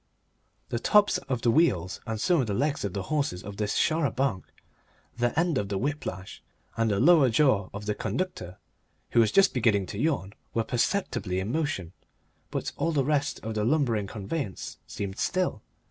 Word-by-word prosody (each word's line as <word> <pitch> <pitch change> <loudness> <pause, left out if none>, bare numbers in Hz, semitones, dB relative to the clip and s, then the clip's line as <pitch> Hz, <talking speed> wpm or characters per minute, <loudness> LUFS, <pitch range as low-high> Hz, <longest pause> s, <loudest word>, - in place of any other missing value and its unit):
The 120 - -1
tops 210 - +4
of 125 -3 -1
the 120 - +4
wheels 100 - +2
and 110 -1 -3
some 170 - +3
of 125 - -2
the 100 - -1
legs 145 +4 0
of 100 -3 -2
the 100 - -3
horses 140 -9 -1
of 100 0 -8
this 105 -1 -1
char 160 +1 +2
a - - -4
banc, 125 -7 -1 0.7
the 120 +5 0
end 165 -5 +2
of 100 - -3
the 100 - -1
whip 145 +7 -2
lash 95 +1 -7 0.3
and 115 -1 +1
the 100 -2 +1
lower 150 -2 +6
jaw 110 -6 +3
of 100 +1 -7
the 105 - 0
conductor 105 - -4 0.5
who 120 - +4
was 110 -2 +4
just 195 -1 +5
beginning 110 -6 +2
to 100 +2 -6
yawn 135 -10 0 0.2
were 115 - +2
perceptibly 115 - -1
in 95 +4 -3
motion, 125 - -2 0.6
but - - -3
all 165 - 0
the 140 -4 +1
rest 145 0 0
of 110 +1 -3
the 105 -1 -1
lumbering 120 -6 +1
conveyance 105 - -5
seemed 100 -1 -5
still. 185 -11 0
115 Hz, 190 wpm, -27 LUFS, 100-150 Hz, 0.7 s, lower